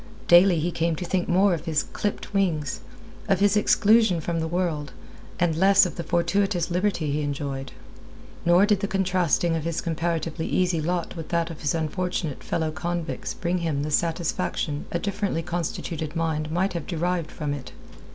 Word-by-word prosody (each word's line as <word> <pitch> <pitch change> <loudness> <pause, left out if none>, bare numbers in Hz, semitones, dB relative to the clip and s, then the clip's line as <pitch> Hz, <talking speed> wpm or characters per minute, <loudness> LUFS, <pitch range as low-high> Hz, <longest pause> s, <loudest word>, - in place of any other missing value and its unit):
Daily 175 0 +7
he 170 +3 -1
came 165 0 0
to 175 - -5
think 180 +1 -1
more 190 +2 +4
of 165 -1 -4
his 160 -3 +1
clipped 205 -1 -4
wings, 160 -9 0 0.5
of 195 - +3
his 205 0 +4
exclusion 210 -2 +4
from 165 +1 -2
the 160 - -1
world, 160 -4 -2 0.5
and 170 -2 +2
less 195 +4 +6
of 180 - -4
the - - -3
fortuitous 175 0 0
liberty 180 -4 0
he 150 +2 0
enjoyed. 140 -2 -4 0.7
Nor 175 +3 +5
did 205 -2 +2
the 200 - -1
contrasting 180 -4 +1
of 160 - -2
his 165 0 -2
comparatively 165 0 -2
easy 180 -3 +1
lot 175 +2 -2
with 165 -2 -7
that 170 0 0
of 160 - -10
his 150 +1 0
unfortunate 165 -1 -2
fellow 160 -2 -1
convicts 170 +1 -4
bring 180 0 -1
him 155 -4 -1
the 155 - -3
satisfaction 160 -2 -1
a - - 0
differently 200 -3 -2
constituted 165 -2 -4
mind 160 -2 -1
might 180 +4 0
have 170 -4 -4
derived 175 -1 -1
from 150 -2 -3
it. 140 -3 -7
170 Hz, 175 wpm, -25 LUFS, 160-180 Hz, 0.7 s, Daily